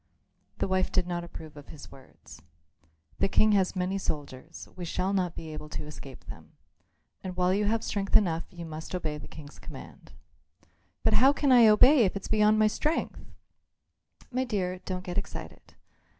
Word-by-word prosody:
The - - -1
wife 185 0 0
did 185 -2 +1
not 175 -1 -3
approve 160 -3 -10
of 145 -1 -12
his 150 -2 -12
words. 135 - -15 0.8
"The - - +3
King 215 +2 +3
has 195 -2 +2
many 185 +1 -1
soldiers; 150 -2 -6
we 180 - -7
shall 185 +3 -1
not 180 -3 0
be 160 -1 -7
able 150 0 -8
to 150 - -5
escape 140 -3 -11
them. - - -11 0.7
And 185 -1 -6
while 180 0 +2
you 205 +2 +1
have 225 +2 0
strength 195 -1 -1
enough 170 -5 0
you 175 -3 -9
must 160 +2 -6
obey 155 -4 -3
the - - -10
King's 150 -2 -12
command." - - -11 0.9
"But - - +3
how 270 +2 +6
can 285 -1 +1
I 240 -3 +8
obey 250 +7 +7
if 190 - 0
it's 195 - -5
beyond 215 0 +4
my 215 - +4
strength?" 305 +9 -1 1.1
"My 255 +1 0
dear, 185 -7 -2
don't 185 -1 -4
get 180 0 -2
excited. 200 - -9
185 Hz, 180 wpm, -28 LUFS, 160-210 Hz, 1.1 s, I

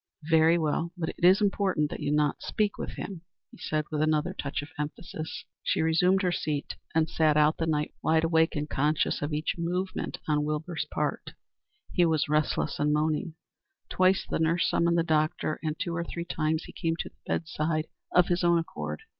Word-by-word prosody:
"Very 160 +1 +5
well. 165 +1 0
But 160 -2 -2
it - - -8
is 185 +4 +6
important 195 -7 +1
that - - -5
you - - -3
should 150 - +2
not 150 -1 +1
speak 210 -1 0
to - - -4
him," 190 -5 -6 0.3
he - - -16
said 155 -2 -1
with 150 -1 -1
another 155 +3 +1
touch 140 -3 -3
of 145 - -11
emphasis. 155 +1 -5 0.2
She - - +1
resumed 180 +4 +3
her 180 - +2
seat 150 -4 -2 0.2
and 160 -1 +3
sat 155 -2 +2
out 150 +1 +4
the 165 - -1
night, 150 -1 0
wide 160 0 +3
awake 160 0 +3
and 150 0 -2
conscious 150 +2 +1
of 145 +2 -2
each 155 +3 -2
movement 180 +3 -2
on 150 -1 +2
Wilbur's 155 +3 -3
part. - - -2 0.6
He 180 - +4
was 160 -2 +1
restless 150 0 0
and 150 0 +2
moaning. 155 +1 0 0.5
Twice 185 +1 +3
the - - -1
nurse 165 +2 +2
summoned 170 0 +2
the 165 - +3
doctor, 155 -1 0
and 155 -1 -2
two 170 -3 -3
or 170 - -1
three 170 0 -5
times 160 -1 -1
he - - -10
came 165 -2 -1
to - - -5
the - - -36
bed 165 - -1
side 155 0 -1 0.3
of 180 - +5
his 175 0 0
own 170 0 +5
accord. 75 - -4
160 Hz, 205 wpm, -28 LUFS, 150-170 Hz, 0.6 s, is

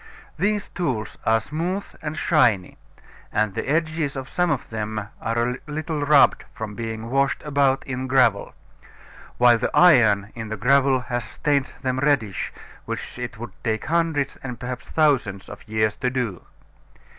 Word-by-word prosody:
These 210 0 0
tools 125 - -3
are 110 0 +5
smooth 170 - -3 0.2
and 155 0 -4
shiny: 120 - +2 0.5
and 105 -2 +1
the 125 - -3
edges 155 -1 0
of 135 -1 -5
some 180 -1 +1
of 140 -7 -2
them 110 -1 -4
are 115 +1 -2
a 125 - -4
little 155 0 -3
rubbed 145 -1 +5
from 110 -1 -5
being 115 +1 -5
washed 135 +1 +1
about 140 -2 +1
in 130 0 -4
gravel; 125 -6 +2 0.8
while 120 -1 +6
the - - 0
iron 110 - +5
in 115 -1 -6
the 110 - -4
gravel 135 +3 +3
has 120 -2 -3
stained 140 +4 0 0.2
them 130 0 0
reddish, 130 -9 0 0.3
which - - -6
it 125 -1 -5
would 120 +2 -7
take 110 -2 -1
hundreds 160 -4 0
and 125 -3 -7
perhaps 125 +2 -6
thousands 130 -11 +1
of 100 - -11
years 110 0 +1
to 125 - 0
do. 120 -9 -3
130 Hz, 155 wpm, -23 LUFS, 110-145 Hz, 0.8 s, while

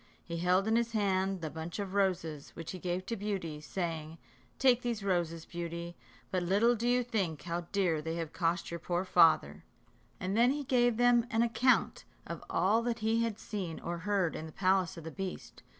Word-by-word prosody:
He 170 -1 -5
held 180 +4 +2
in 225 +1 +3
his 235 0 0
hand 195 -3 +1
the 155 -2 -4
bunch 160 +1 -6
of 200 -2 -4
roses, 170 -7 -1
which 165 -1 -6
he 185 - -7
gave 180 +1 -2
to 230 - -2
Beauty, 190 -8 -3
saying: 165 -2 -4 0.4
"Take 250 -2 +4
these 235 -4 -2
roses, 170 -4 -1
Beauty; 170 0 -5 0.4
but 185 - +1
little 200 +7 +3
do 235 +2 -2
you 245 0 +3
think 195 -10 -2
how 170 0 -3
dear 180 -6 +1
they 160 +1 -3
have 165 -2 -4
cost 170 0 0
your 170 - -4
poor 175 +2 -1
father;" 160 - +4 0.6
and 185 +2 -2
then 235 +2 +5
he 290 +2 -1
gave 245 -3 +2
them 245 -1 +4
an 225 +1 +2
account 245 +2 +2 0.2
of - - -6
all 215 +5 +3
that 235 0 -1
he 225 +1 +3
had 230 -3 -1
seen 195 -8 -5
or 170 0 -4
heard 190 -2 0
in 160 - -5
the - - -10
palace 185 -1 +1
of 165 - -8
the 160 - -6
beast. 190 0 -6
185 Hz, 200 wpm, -32 LUFS, 170-225 Hz, 0.6 s, then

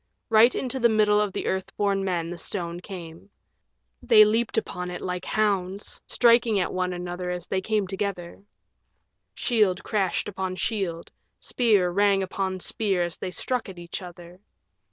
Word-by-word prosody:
Right 225 +2 +6
into 265 0 -3
the 235 -1 +4
middle 210 -1 +3
of 210 -2 0
the - - -4
Earth 190 +1 -3
born 200 -1 +1
Men 175 -3 -2
the 175 - -6
stone 175 -3 -3
came. 175 -1 -10 0.7
They 215 -2 +7
leaped 225 +2 0
upon 180 -4 -2
it 180 - -5
like 180 0 -4
hounds, 200 -2 -1
striking 235 -3 +4
at 180 - -1
one 185 0 -1
another 180 0 -5
as 180 -1 -4
they 190 - -1
came 215 0 0
together. 190 -2 -4 0.9
Shield 210 -7 +1
crashed 195 -4 -1
on 190 -1 -3
shield, 185 -5 -3 0.3
spear 210 -7 +2
rang 200 +1 +3
upon 190 0 -3
spear 195 -4 +1
as 175 0 -4
they 185 - -4
struck 245 +5 -2
at 185 - -10
each 175 +1 -6
other. 175 0 -11
190 Hz, 160 wpm, -25 LUFS, 180-210 Hz, 0.9 s, They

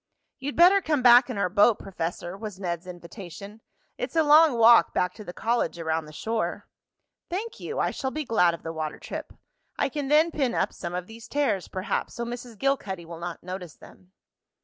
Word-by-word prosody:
"You'd 280 +2 -4
better 365 +4 +6
come 300 -7 0
back 245 +1 +7
in 245 - -4
our 200 -2 +1
boat, 205 +4 +4
Professor," 175 -1 -5
was 205 -2 -8
Ned's 175 -2 -4
invitation. 185 +3 -10 0.4
"It's - - -4
a 320 - +4
long 300 -3 +6
walk 230 -4 +6
back 180 0 +1
to 215 - -10
the 175 - -7
college 230 -1 -1
around 160 -1 -2
the 150 - -12
shore." 220 +8 -3 0.6
"Thank 440 +6 -4
you, - - -5
I - - +1
shall 265 - -3
be 305 +2 -4
glad 180 -8 +3
of - - -16
the 165 - -5
water 155 -1 -4
trip. - - -7 0.5
I - - +1
can 285 0 -4
then 310 +4 +4
pin 265 -6 -1
up 195 - 0
some 175 - -6
of 180 0 -3
these 225 +3 -12
tears, 280 -10 0
perhaps, 185 0 -3
so 235 - -3
Mrs. 240 -1 -7
Gilcuddy 200 -9 -1
will 165 0 -9
not 170 0 -6
notice 180 -2 -7
them." 185 0 -17
215 Hz, 200 wpm, -26 LUFS, 175-265 Hz, 0.6 s, back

